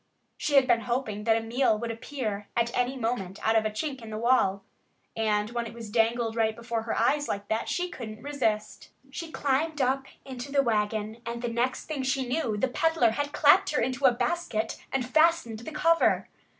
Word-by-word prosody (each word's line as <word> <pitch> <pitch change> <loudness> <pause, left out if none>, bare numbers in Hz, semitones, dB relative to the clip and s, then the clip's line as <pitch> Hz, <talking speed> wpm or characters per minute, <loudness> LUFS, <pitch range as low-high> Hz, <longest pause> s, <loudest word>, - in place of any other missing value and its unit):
She 290 - -1
had 270 -2 +7
been 240 -2 +3
hoping 225 -4 -2
that 225 -1 +4
a - - -1
meal 235 -1 +2
would 230 +1 -3
appear 225 -4 -4
at 235 0 +1
any 250 +2 0
moment 225 -6 -2
out 220 - +3
of 220 -1 +3
a - - -2
chink 265 +5 -4
in 225 - -9
the 215 - -5
wall. 220 -5 +2 0.5
And 215 -1 0
when 235 -1 -2
it 230 - -10
was 225 -3 -8
dangled 230 0 +1
right 220 -1 +1
before 235 0 -3
her 225 0 -3
eyes 290 +6 +2
like 200 0 -3
that 220 +1 -1
she 360 0 -1
couldn't 220 -8 -8
resist 220 -7 -2 0.2
it. 270 - -24
She 335 0 -5
climbed 290 +3 0
up 265 +1 +1 0.2
into 260 +1 -7
the 280 -1 +3
wagon. 215 -1 -1
And 235 +1 -5
the 240 - 0
next 240 +2 -1
thing 305 -4 -3
she 265 0 0
knew 245 -5 -1
the 235 - +1
peddler 310 -2 +2
had 290 +5 -2
clapped 295 0 +5
her - - +3
into 260 +3 0
a 260 - +8
basket 240 -3 -1 0.2
and 265 -2 0
fastened 315 -6 +3
the 240 +7 -8
cover. 330 +2 +3
235 Hz, 210 wpm, -28 LUFS, 220-270 Hz, 0.5 s, a